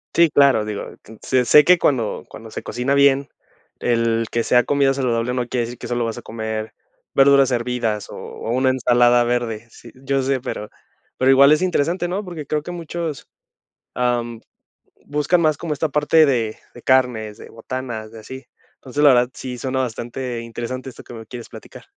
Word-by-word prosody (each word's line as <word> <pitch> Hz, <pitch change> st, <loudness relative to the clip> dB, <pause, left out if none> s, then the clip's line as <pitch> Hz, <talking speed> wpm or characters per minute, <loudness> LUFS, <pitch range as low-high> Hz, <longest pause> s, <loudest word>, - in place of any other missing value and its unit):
Sí, 170 Hz, -1 st, +5 dB
claro, 140 Hz, -6 st, +4 dB
digo, 105 Hz, -1 st, -6 dB
que 110 Hz, +1 st, -14 dB
sé 130 Hz, -1 st, +2 dB
sé 150 Hz, +5 st, +6 dB
que 180 Hz, 0 st, +6 dB
cuando 125 Hz, -9 st, 0 dB
cuando 115 Hz, 0 st, -11 dB
se -, -, -7 dB
cocina 125 Hz, +3 st, -1 dB
bien, 140 Hz, 0 st, +4 dB, 0.5 s
el 115 Hz, -1 st, +1 dB
que 115 Hz, -1 st, 0 dB
sea 125 Hz, 0 st, +4 dB
comida 140 Hz, -1 st, +2 dB
saludable 125 Hz, -2 st, -1 dB
no 125 Hz, -1 st, -1 dB
quiere 120 Hz, -2 st, -1 dB
decir 120 Hz, +1 st, -8 dB
que 120 Hz, -, -8 dB
solo 120 Hz, -1 st, -1 dB
vas 115 Hz, -, -4 dB
a -, -, -7 dB
comer 110 Hz, -1 st, -5 dB, 0.4 s
verduras 135 Hz, -1 st, +5 dB
hervidas 120 Hz, -4 st, -2 dB
o -, -, -9 dB
o -, -, -8 dB
una 130 Hz, +2 st, +2 dB
ensalada 120 Hz, -1 st, +3 dB
verde. 120 Hz, -2 st, -2 dB
Sí, 115 Hz, 0 st, -15 dB
yo 135 Hz, +1 st, -2 dB
sé, 135 Hz, 0 st, 0 dB
pero 105 Hz, -3 st, -6 dB, 0.5 s
pero 130 Hz, +1 st, +4 dB
igual 140 Hz, +2 st, +7 dB
es 155 Hz, +3 st, +4 dB
interesante, 175 Hz, 0 st, 0 dB
¿no?, 190 Hz, +4 st, -3 dB
porque 170 Hz, -6 st, -7 dB
creo 150 Hz, 0 st, -1 dB
que 175 Hz, -, -7 dB
muchos, 170 Hz, -3 st, -5 dB, 0.7 s
am, 120 Hz, -2 st, -1 dB, 0.6 s
buscan 150 Hz, +4 st, +1 dB
más 155 Hz, -3 st, +2 dB
como 165 Hz, -3 st, -4 dB
esta 155 Hz, +2 st, -1 dB
parte 150 Hz, +2 st, +4 dB
de 115 Hz, -6 st, 0 dB, 0.2 s
de 120 Hz, -, -14 dB
carnes, 120 Hz, -5 st, +1 dB
de -, -, -11 dB
botanas, 115 Hz, -2 st, -6 dB
de 115 Hz, -, -10 dB
así. 130 Hz, +4 st, -10 dB, 0.3 s
Entonces, 145 Hz, +2 st, -4 dB
la 150 Hz, -, +8 dB
verdad, 125 Hz, 0 st, +3 dB
sí 125 Hz, -2 st, -7 dB
suena 130 Hz, +1 st, -2 dB
bastante 120 Hz, +1 st, -4 dB
interesante 120 Hz, +3 st, -6 dB
esto -, -, -13 dB
que -, -, -12 dB
me 115 Hz, -1 st, -9 dB
quieres 120 Hz, +1 st, -9 dB
platicar. 110 Hz, -, -12 dB
125 Hz, 190 wpm, -21 LUFS, 115-140 Hz, 0.7 s, la